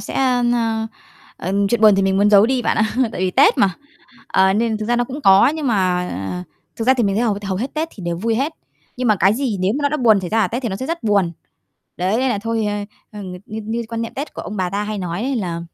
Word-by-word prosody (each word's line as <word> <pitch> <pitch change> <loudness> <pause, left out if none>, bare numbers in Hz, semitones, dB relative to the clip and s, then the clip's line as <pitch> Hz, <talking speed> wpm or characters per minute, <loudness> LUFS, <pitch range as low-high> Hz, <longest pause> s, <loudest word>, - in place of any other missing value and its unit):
sẽ - - -7
ơ, 255 -2 +2
ơ, 225 -2 0 0.5
ờ, 185 - -4 0.2
chuyện 235 +2 0
buồn 215 -2 +7
thì 195 - +1
mình 190 0 +1
muốn 205 +1 +3
giấu 205 +1 +6
đi 255 0 0
bạn - - 0
ạ, 220 0 +1 0.2
tại - - -5
vì 185 0 +1
Tết - - +4
mà. 195 - +4 0.6
Ờ, 190 0 +3
nên 220 +1 0
thực 215 - -4
ra 240 +1 +1
nó 245 - +1
cũng 265 +4 -7
có 195 +5 +7
nhưng 310 -3 -3
mà 180 - -1 0.3
thực 225 - -3
ra 260 - +6
thì 245 -3 +1
mình 200 -1 0
thấy 220 - +1
hầu 215 -4 +1
hầu 190 -1 -2
hết 245 +8 -4
Tết 315 +1 -1
thì 195 - -11
đều 170 -1 -2
vui 225 +6 -1
hết. 275 +7 -1 0.4
Nhưng 250 -1 -1
mà 215 - +4
cái 195 +3 +3
gì 250 -4 -1
nếu 185 +2 +1
mà - - -4
nó 285 - +3
đã 300 - -1
buồn 225 -7 +4
xảy 180 -2 -6
ra 225 - +2
ở - - +2
Tết 245 +4 -4
thì 235 - -1
nó 190 - -3
sẽ 260 - -5
rất 335 +2 -3
buồn. 200 -5 +1 0.6
Đấy, 185 +4 0
nên 265 +1 +1
là 230 -5 0
thôi, 225 +1 -2
ơ, 205 0 -2 0.3
ờ, 210 - -9
ng 185 -2 -7
như 215 +1 -6
như 225 +2 -2
quan 230 0 -3
niệm 230 - -6
Tết 285 +3 -6
của - - -6
ông 210 - -6
bà 185 -2 -1
ta 200 +2 -2
hay 210 0 -4
nói 180 +1 -3
đấy 265 +1 -1
là, 175 -6 -3
215 Hz, 295 wpm, -19 LUFS, 195-240 Hz, 0.6 s, buồn